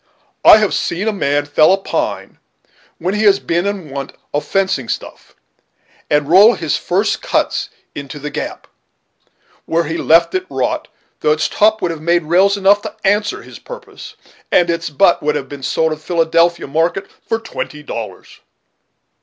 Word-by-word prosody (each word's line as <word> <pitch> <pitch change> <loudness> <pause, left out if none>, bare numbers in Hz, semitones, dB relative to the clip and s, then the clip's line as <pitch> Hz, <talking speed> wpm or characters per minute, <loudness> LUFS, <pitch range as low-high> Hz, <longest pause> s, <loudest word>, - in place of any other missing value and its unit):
I - - +9
have 215 -2 +1
seen 185 +6 -2
a 220 - +1
man 145 -6 0
fell 145 +3 +4
a 195 - +4
pine, 195 - -4 0.6
when 180 +3 -2
he 210 - -1
has 200 -1 +6
been 170 +3 -1
in 190 -8 -4
want 140 0 -6 0.2
of 145 - 0
fencing 190 -10 -1
stuff, - - -7 0.7
and 150 -1 +2
roll 200 +8 +7
his 160 -3 -1
first - - -1
cuts - - -1 0.2
into 140 +1 -8
the 150 +1 -6
gap, - - -5 1.0
where 170 +1 +1
he 165 +1 -4
left 165 +1 +4
it 185 0 -2
to 135 - -11
rot, 130 -2 -1 0.3
though 150 - +2
its 155 - 0
top 215 0 +2
would 175 - 0
have 160 -2 -7
made 170 +1 +1
rails 190 +5 +3
enough 200 +1 +4
to - - -7
answer 210 +1 0
his - - -12
purpose, - - -11 0.4
and 175 -1 +3
its 170 -1 -3
butt 170 +5 +3
would 150 0 0
have 140 -1 -5
sold 160 +3 0
in 155 - -4
the - - -23
Philadelphia 170 0 +1
market 165 +6 -1 0.2
for 225 - 0
twenty 155 -9 -7
dollars." - - -8
170 Hz, 175 wpm, -17 LUFS, 150-195 Hz, 1.0 s, I